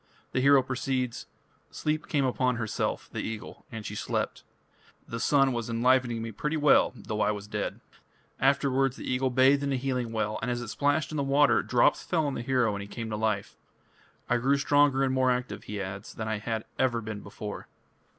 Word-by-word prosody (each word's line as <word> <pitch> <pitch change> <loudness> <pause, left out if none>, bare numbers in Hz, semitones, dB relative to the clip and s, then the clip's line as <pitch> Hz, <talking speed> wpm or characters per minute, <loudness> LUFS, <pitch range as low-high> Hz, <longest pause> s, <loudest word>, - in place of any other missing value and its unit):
The 130 - 0
hero 140 0 +6
proceeds: 130 -1 -2 0.4
"Sleep 155 0 -2
came 140 -3 +1
upon 125 0 +1
herself 110 -2 -2
(the - - -3
eagle) 110 -1 -7
and 110 -2 -7
she - - -5
slept. 105 - -2 0.6
The 115 - -5
sun 135 +1 +3
was 120 -1 -3
enlivening 120 0 +2
me 115 - -5
pretty 150 +9 -2
well 150 -1 +5
though 105 -1 -4
I - - +3
was 105 -1 -3
dead." 105 0 -4 0.6
Afterwards 135 -1 +2
the - - -7
eagle 130 +1 +1
bathed 130 +2 +4
in 140 -1 -1
a - - +1
healing 125 -3 -2
well, 110 -1 -1
and 120 - -2
as 120 0 -1
it 120 -3 -6
splashed 145 +6 0
in 155 - -3
the 140 - +1
water, 140 -2 +4
drops 120 -1 +3
fell 160 -4 0
on 140 - -1
the - - -3
hero 125 -3 +1
and 100 - -4
he 100 - -7
came 115 +1 -6
to - - -1
life. 105 -2 -1 0.7
"I 120 - +2
grew 135 +4 +2
stronger 145 -1 +3
and 130 -1 +1
more 130 -1 +3
active", 125 0 -2
he 105 -1 -5
adds, 95 +1 -6
"than 110 -2 -4
I 110 -1 -1
had 110 0 -3
ever 125 -3 +2
been 110 -2 -6
before." 105 0 -7
125 Hz, 205 wpm, -28 LUFS, 110-135 Hz, 0.7 s, hero